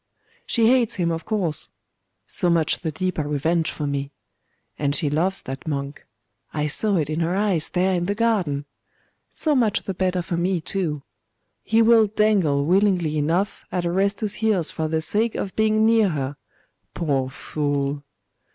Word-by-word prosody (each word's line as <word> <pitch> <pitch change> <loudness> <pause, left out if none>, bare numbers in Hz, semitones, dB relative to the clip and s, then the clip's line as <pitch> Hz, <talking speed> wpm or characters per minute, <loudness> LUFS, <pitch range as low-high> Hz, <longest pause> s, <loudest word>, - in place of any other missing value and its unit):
She 230 -2 +2
hates 240 -1 +3
him, 170 -3 0
of 165 0 -4
course.... 185 -9 -1 0.6
So 175 - -1
much 165 -2 +2
the 160 -3 -3
deeper 175 -2 -2
revenge 160 +3 0
for 150 - -4
me. 140 0 -3 0.7
And 145 -1 0
she 145 -2 0
loves 180 +6 0
that 135 +5 -7
monk. 140 -1 -4 0.4
I 150 -1 -1
saw 195 +7 +1
it 155 -4 0
in 155 +1 -2
her 170 +2 0
eyes 195 -6 +1
there 185 +1 +1
in 175 -1 0
the 205 - 0
garden. 195 -11 0 0.6
So 310 - 0
much 230 -5 +2
the 195 - -3
better 185 -1 0
for 170 0 -3
me, 180 +1 +1
too. 160 -4 -3 0.6
He 225 +1 +3
will 225 -1 +6
dangle 195 -10 +2
willingly 180 -3 +2
enough 165 +7 0
at 180 -1 -1
Orestes's 200 +4 0
heels 205 -7 +2
for 160 -1 -2
the 160 0 -1
sake 215 +8 0
of 195 - -4
being 220 0 +3
near 225 -2 +4
her 140 -3 -3 0.6
poor 135 -5 0
fool! 140 0 -2
175 Hz, 165 wpm, -23 LUFS, 150-205 Hz, 0.7 s, will